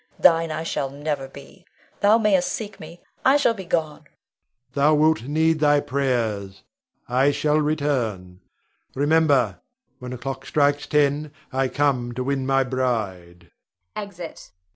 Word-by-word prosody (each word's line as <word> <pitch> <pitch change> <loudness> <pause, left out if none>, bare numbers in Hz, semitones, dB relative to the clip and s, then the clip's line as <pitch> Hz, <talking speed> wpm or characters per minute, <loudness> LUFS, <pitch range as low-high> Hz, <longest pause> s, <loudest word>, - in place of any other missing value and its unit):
Thine 165 -2 +4
I 155 +1 -3
shall 140 -4 -2
never 145 -1 -4
be! 140 +6 -14 0.4
Thou 210 +2 +5
mayst 200 -5 +2
seek 215 -2 -6
me; 165 +2 -12 0.2
I 270 +2 +5
shall 260 -5 +2
be 195 -4 -8
gone. 160 -3 -1
Rod. - - -27 0.6
Thou 145 +2 +3
wilt 155 -3 +3
need 160 +3 +1
thy 145 -1 +4
prayers. 115 -9 -2 0.4
I 130 +3 +3
shall 150 +1 +1
return, 125 -12 -1 0.6
remember, 140 - +2 0.4
when 125 - -7
the 125 - -5
clock 135 +2 -6
strikes 145 -1 +1
ten, 150 0 +1 0.2
I 135 0 +1
come 130 -3 0
to 130 - -2
win 135 0 -1
my 135 0 +3
bride. 100 -10 -3 0.4
[Exit. 180 -5 -8
Leonore. 90 0 -51
145 Hz, 145 wpm, -23 LUFS, 125-155 Hz, 0.6 s, Thou